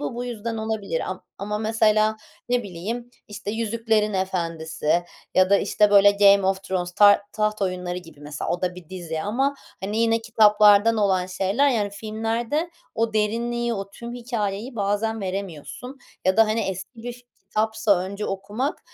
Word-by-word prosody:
bu 145 +9 -3
bu 245 +1 -4
yüzden 230 -1 -4
olabilir. 220 -6 -2
Am 185 - -6 0.2
ama 210 +2 -3
mesela, 215 0 +2 0.3
ne 245 -1 +1
bileyim, 215 +6 -6 0.2
işte, 205 0 -6
“Yüzüklerin 220 -1 0
Efendisi” 170 -3 -1 0.3
ya 185 0 +4
da, 200 - +7
işte, 210 -1 +2
böyle, 205 0 +7
“Game 200 -1 +5
of 190 0 0
Thrones”, 180 -2 -3
Tar 205 +2 +6
Taht 215 -1 -1
Oyunları 180 -1 -2
gibi 165 -4 -14
mesela, 145 0 -5
o 175 +1 -2
da 180 0 0
bir 180 -3 -12
dizi 165 -4 -5
ama, 270 +7 0 0.3
hani, 210 +3 -2
yine 230 0 +3
kitaplardan 215 -1 +5
olan 190 -3 +2
şeyler. 195 +9 +1
Yani 210 -6 0
filmlerde 225 - -2 0.2
o 225 0 0
derinliği, 235 +2 0
o 195 0 -5
tüm 235 +3 -8
hikâyeyi 230 -1 -3
bazen 210 +2 -1
veremiyorsun 195 - -6 0.3
ya 185 +2 +3
da, 225 -1 +6
hani, 220 +1 0
eski 195 +5 -5
bir 245 +1 -4
fi 245 +1 -15 0.3
kitapsa, 220 -2 +2
önce 200 +3 -4
okumak, 205 +8 -3
210 Hz, 165 wpm, -24 LUFS, 190-225 Hz, 0.3 s, da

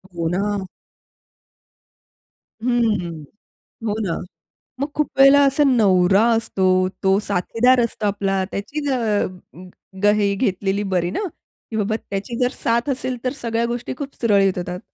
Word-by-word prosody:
हो 165 -1 -1
ना. 200 +2 -1 2.0
हं. 210 -10 0 0.6
हो 210 - 0
ना. 170 -4 -2 0.6
मग 280 - -1
खूप 300 - 0
वेळेला 275 +1 +7
असा 275 +2 +3
नवरा 195 -4 +4
असतो, 195 -4 -1 0.4
तो 190 0 +4
साथीदार 230 +6 +2
असतो 225 -2 -2
आपला. 195 -1 0
त्याचीही 285 +9 -4
अ 260 - +1 1.1
गं 205 0 +6
हे 200 -1 +1
घेतलेली 195 -2 -1
बरी 175 0 0
ना, - - -3 0.5
की - - -4
बाबा 215 +1 0
त्याची 205 +4 -4
जर 250 0 +2
साथ 235 +4 +1
असेल, 255 -1 -2
तर 255 - 0
सगळ्या 230 0 -1
गोष्टी 240 +1 -4
खूप 280 -1 -6
सुरळीत 200 -4 +3
होतात. 180 0 -4
210 Hz, 135 wpm, -21 LUFS, 195-245 Hz, 2.0 s, वेळेला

